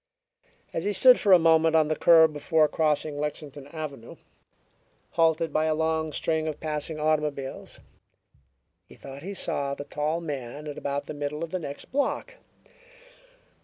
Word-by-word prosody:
As 165 - -2
he 205 +1 0
stood 250 +5 +6
for 200 - +2
a 185 - +10
moment 160 -1 +4
on 155 -1 +4
the 155 - 0
curb 160 -1 +6
before 155 +1 +2
crossing 150 -1 0
Lexington 145 -1 -5
Avenue, 145 -6 -8 1.0
halted 165 -1 +1
by 155 - +2
a 155 -1 +1
long 160 0 -1
string 160 +1 -1
of 155 - -4
passing 155 0 -3
automobiles, 150 -3 -2 1.1
he - - -15
thought 135 +1 -10
he 195 +5 -6
saw 140 -6 -2
the 145 - -7
tall 155 +3 -2
man 145 -3 -6
at 150 -1 -6
about 140 0 -3
the - - -6
middle 145 +2 -4
of 165 - -6
the 185 - -2
next 140 -4 -8
block. 290 - -2
155 Hz, 160 wpm, -26 LUFS, 145-160 Hz, 1.1 s, a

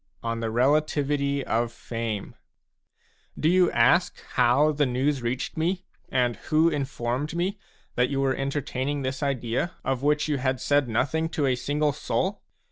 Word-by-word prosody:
ON 115 0 -2
THE 115 -1 -2
RELATIVITY 140 +2 +1
OF 115 +1 0
FAME 115 -3 -4 1.1
Do 155 - +2
you 180 +1 +5
ask 170 +10 +3
how 130 +5 +4
the 145 -1 +1
news 130 +2 0
reached 125 +5 -3
me, 180 +3 -1 0.2
and 125 -3 +1
who 160 +2 +4
informed 135 0 -2
me, 190 +4 -1 0.3
that 125 0 +2
you 140 - -1
were 135 -1 +2
entertaining 140 0 -2
this 130 +2 -3
idea, 135 +3 -1
of 135 -1 0
which 150 +1 +2
you 145 -3 0
had 130 0 0
said 145 0 +2
nothing 160 +8 0
to 155 -3 -1
a 130 - +3
single 145 +4 0
soul 190 +7 -2
140 Hz, 155 wpm, -26 LUFS, 125-150 Hz, 1.1 s, you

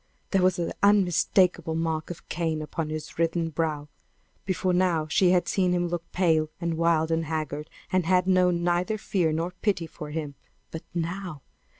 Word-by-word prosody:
There 195 - +3
was 185 0 +3
the 175 -2 -2
unmistakable 180 -4 +3
mark 160 -1 -2
of 175 - -9
Cain 160 -2 -2
upon 155 +1 -4
his 155 +1 -6
writhen 165 0 +1
brow! 155 -2 -2 0.6
Before 185 -1 0
now 175 -3 +2
she 180 +4 +3
had 180 -1 +3
seen 185 -2 +1
him 175 -1 0
look 170 -1 -5
pale 160 -4 +2
and 170 -2 -1
wild 165 -1 +2
and 165 0 +1
haggard, 150 -1 -3 0.2
and 185 -3 +1
had 180 0 +3
known 180 -2 +3
neither 175 +5 +1
fear 180 -6 0
nor 165 +3 -1
pity 195 -6 +1
for 150 -1 -9
him. 150 -2 -4 0.4
But 160 - -5
now! 175 -3 -4
170 Hz, 175 wpm, -26 LUFS, 160-180 Hz, 0.6 s, There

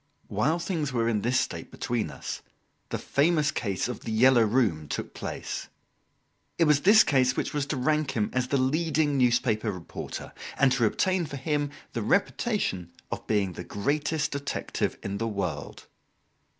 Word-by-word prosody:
While 120 - +1
things 165 -4 -2
were 115 -2 +1
in 110 -3 +1
this 125 +4 +2
state - - -3
between 120 -2 -2
us, - - -6 0.5
the - - -2
famous 155 +1 +2
case 100 -3 -1
of 125 - -5
The 115 - -6
"Yellow 120 +2 +5
Room" 105 - +2
took - - -4
place. - - -5 0.9
It 170 - +4
was 150 -2 +4
this 215 +6 +7
case 130 -3 +3
which - - -1
was 145 -1 -1
to 140 - -2
rank 150 0 +1
him 105 -1 0
as 125 0 0
the 140 - +1
leading 150 +2 +1
newspaper 120 -4 +2
reporter, 90 -4 -7 0.2
and 135 -2 +4
to 125 -3 +3
obtain 185 - +1
for 140 - -6
him 145 +1 -1 0.2
the 115 - -2
reputation 110 - 0 0.2
of - - -5
being 100 -4 +1
the - - -7
greatest 150 +7 -1
detective 140 0 -2
in 100 +1 -3
the 115 - -1
world. 90 -9 -4
130 Hz, 165 wpm, -27 LUFS, 110-150 Hz, 0.9 s, this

